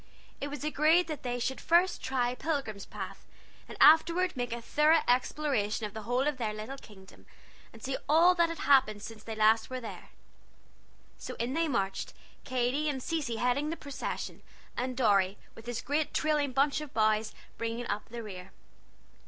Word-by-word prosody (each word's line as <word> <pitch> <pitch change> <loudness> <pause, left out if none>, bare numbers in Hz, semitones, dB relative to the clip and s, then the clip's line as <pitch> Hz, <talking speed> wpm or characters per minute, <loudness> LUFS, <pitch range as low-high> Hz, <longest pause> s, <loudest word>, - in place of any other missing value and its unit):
It 285 - -2
was 290 0 -6
agreed 305 +4 +3
that 305 -3 -4
they 245 -1 -2
should 265 +2 -2
first 350 +2 +3
try 250 -2 0
Pilgrim's 255 -8 -3
Path, - - -7 0.5
and - - -9
afterward 335 +3 +5
make 245 -1 -3
a 235 - -3
thorough 300 +7 +3
exploration 245 -4 +1
of 205 - -7
the 220 - -6
whole 245 +5 0
of 295 -3 -1
their 220 -4 -2
little 230 +6 -7
kingdom, 190 -5 -16 0.4
and 225 - -15
see 265 0 -2
all 335 +4 +6
that 340 -2 +2
had 330 - -5
happened 255 -8 +3
since 225 -1 -10
last 220 0 +3
they 255 - -5
were - - -2
there. 230 - -9 1.1
So - - -7
in 240 +3 -2
they 330 +2 +1
marched, 195 -8 -2 0.3
Katy 255 +4 0
and 265 -3 -3
Cecy 300 -8 -2
heading 250 +6 0
the 325 - -2
procession, 280 -2 -5 0.3
and 250 0 -3
Dorry, 200 -5 +3 0.2
with 225 +1 -13
his 240 -1 -3
great 295 +2 -1
trailing 300 -3 +1
bunch 275 +2 +2
of 295 -6 -9
boughs, 215 0 +2 0.2
bringing 230 +1 -3
up 210 - -4
the 235 0 -6
rear. 190 -3 -9
255 Hz, 175 wpm, -30 LUFS, 225-300 Hz, 1.1 s, all